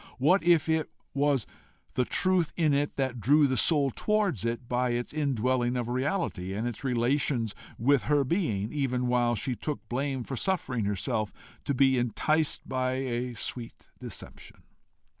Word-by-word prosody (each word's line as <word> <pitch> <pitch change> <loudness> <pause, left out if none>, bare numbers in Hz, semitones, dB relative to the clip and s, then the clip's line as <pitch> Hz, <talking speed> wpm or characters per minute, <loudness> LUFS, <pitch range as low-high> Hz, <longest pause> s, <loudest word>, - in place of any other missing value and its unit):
What 175 +9 +4
if 170 -2 +4
it 160 -1 +1 0.2
was 140 -4 +1 0.5
the 125 - +1
truth 185 0 +1
in 155 -4 +3
it 145 +1 0
that 130 -3 -1
drew 145 +6 +5
the 130 -1 +1
soul 140 +2 +3
towards 205 - 0
it 120 +1 -2
by 125 0 0
its 120 +3 -3
indwelling 130 -4 +1
reality, 125 - -2
and 110 +4 -2
its 120 +1 -6
relations 125 -2 +1 0.2
with 135 +3 +3
her 145 -1 +3
being, 120 - -1
even 130 -4 0
while 120 -1 +2
she 125 +5 -1
took 145 +4 -5
blame 135 0 -2
for 135 - -5
suffering 125 - -1
herself 105 +2 -1 0.3
to 140 - 0
be 130 -1 +4
enticed 150 +6 0
by 130 -1 0
a 125 -2 -2
sweet 115 +2 -5
deception? - - -10
130 Hz, 155 wpm, -28 LUFS, 120-145 Hz, 0.5 s, drew